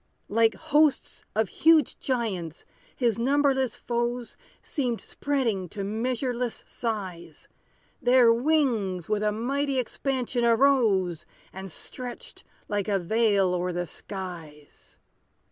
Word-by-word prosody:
Like 225 +1 +3
hosts 305 -2 +1
of 220 -3 +1
huge 320 -1 +3
giants, 195 - -3 0.3
his 235 -3 +1
numberless 265 -1 +2
foes 240 0 -2 0.3
Seemed 250 -7 -2
spreading 230 -11 -2
to 200 +2 -5
measureless 245 +3 -2
size: 185 -8 -5 0.5
Their 245 -2 +6
wings 235 - +1
with 210 -1 0
a 210 0 +2
mighty 270 +5 -1
expansion 255 0 -1
arose, 225 - +3 0.3
And 190 0 -7
stretched 245 +8 -8 0.2
like 205 -1 -1
a 200 -2 +2
veil 200 0 +2
o'er 180 0 -1
the 175 0 -2
skies. 170 -6 -9
230 Hz, 110 wpm, -26 LUFS, 195-255 Hz, 0.5 s, Their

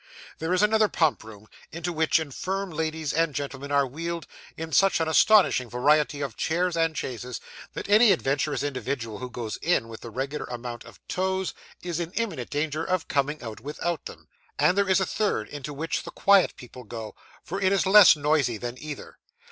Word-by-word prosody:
There 160 +2 -2
is 185 +3 +3
another 215 0 +4
pump 160 - +1
room, 110 -1 -13 0.2
into 170 +2 -4
which 160 0 +3
infirm 185 +6 -3
ladies 160 -1 -2
and 165 -2 +1
gentlemen 140 0 -5
are 140 -1 +3
wheeled, 165 +5 -5 0.3
in 160 0 -6
such 195 +1 +4
an 160 - 0
astonishing 160 - +4
variety 145 +4 +2
of 135 -6 -4
chairs 175 +2 0
and 165 -1 +1
chaises, 125 -2 -5 0.3
that - - -6
any 210 +2 +6
adventurous 145 -4 0
individual 130 -5 -3
who 125 - -6
goes 115 -2 -5
in 160 -9 +1
with 115 - -9
the 115 - -8
regular 135 +6 -4
number 120 0 -6
of - - -15
toes, 190 0 -1 0.3
is 175 -2 -3
in 170 +1 -4
imminent 185 - -3
danger 150 +1 -1
of 185 -3 -1
coming 145 +1 -1
out 110 -2 -7
without 150 +4 -3
them; - - -10 0.3
and 155 +5 +3
there 200 -1 +2
is 190 - +4
a 190 - +1
third, 210 +1 -1
into 145 0 -6
which 155 +3 -3
the - - -9
quiet 200 -2 +4
people 125 0 -11
go, 110 -1 -7 0.3
for 195 +4 -5
it 190 0 +3
is 195 -1 +2
less 195 -2 +8
noisy 145 -5 +1
than 120 +2 -6
either. 150 -1 -8
155 Hz, 190 wpm, -26 LUFS, 130-175 Hz, 0.3 s, less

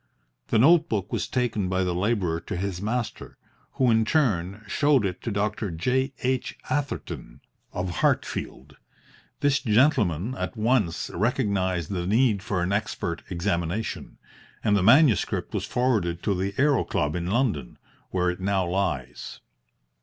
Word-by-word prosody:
The - - +2
notebook 135 - +3
was - - -1
taken 115 -7 -1
by 95 0 +1
the 90 -1 -1
labourer 90 -3 0
to 85 - -5
his 95 -1 -3
master, 110 0 -3 0.4
who 130 -2 +2
in 110 0 +4
turn 105 - 0
showed 145 -5 +3
it 90 -2 -3
to - - -3
Dr. 105 0 -1
J. 125 +11 0
H. 130 0 -1
Atherton, 125 - -3 0.3
of 90 -1 -3
Hartfield. 70 +2 -1 0.6
This 145 0 +3
gentleman 110 - +2
at 130 - -5
once 110 -6 +1
recognised 100 - 0
the 90 -2 -2
need 110 -1 +3
for 95 -2 -1
an 90 - -1
expert 100 -5 -2
examination, 90 +2 -2 0.5
and 105 -2 +3
the 100 - +2
manuscript 120 - +4
was - - -2
forwarded 105 -9 0
to 100 - +1
the 95 +2 -2
Aero 140 -2 +3
Club 75 -1 -1
in 85 0 -2
London, 95 - -1 0.3
where 90 -1 +1
it 90 - -8
now 95 0 0
lies. 85 -9 -3
100 Hz, 145 wpm, -25 LUFS, 90-125 Hz, 0.6 s, in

